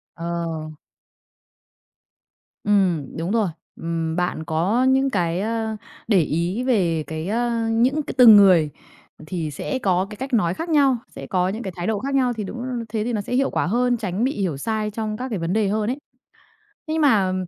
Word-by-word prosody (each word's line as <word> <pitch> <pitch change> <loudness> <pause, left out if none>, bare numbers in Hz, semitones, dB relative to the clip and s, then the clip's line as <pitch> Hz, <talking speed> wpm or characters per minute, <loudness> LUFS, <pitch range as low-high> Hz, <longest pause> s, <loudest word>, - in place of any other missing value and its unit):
Ờ. 170 +1 -6 2.4
Ừm, 185 -10 +1
đúng 170 +4 -2
rồi. 220 -4 +2 0.3
Ừm, 165 -1 -3
bạn 175 -3 -1
có 175 - +1
những 265 +1 +3
cái, 175 -6 0
ơ, 220 0 -2 0.3
để 205 -4 +4
ý 170 +9 -1
về 180 -11 +1
cái 160 +1 -5
ơ, 230 +1 0
những 250 +7 +2
c - - -10
từng 230 -4 +10
người 185 -6 +6 0.6
thì 165 -4 -3
sẽ 260 - -3
có 185 -3 +1
cái 210 - -8
cách 265 0 -6
nói 175 -7 +2
khác 330 - -5
nhau, 280 -5 +4
sẽ - - -10
có 185 -1 +1
những 220 +5 -4
cái 190 -3 -5
thái 175 +2 -4
độ 215 -2 0
khác 275 +1 -2
nhau. 255 -2 +2
Thì 220 -3 -4
đúng, 240 +5 -6 0.2
thế 215 -1 -2
thì 240 - -2
nó 210 - 0
sẽ 205 - -6
hiệu 270 +2 +2
quả - - 0
hơn, 245 +3 +1
tránh 205 0 -2
bị 265 - +2
hiểu 170 -7 -1
sai 215 +7 -2
trong 215 0 -4
các 255 +1 -4
cái 210 - -3
vấn 165 +2 -2
đề 215 -2 +2
hơn 210 +2 0
ấy. 260 - -2 0.9
Nhưng 315 +1 0
mà, 205 -10 +3
210 Hz, 195 wpm, -22 LUFS, 180-240 Hz, 2.4 s, từng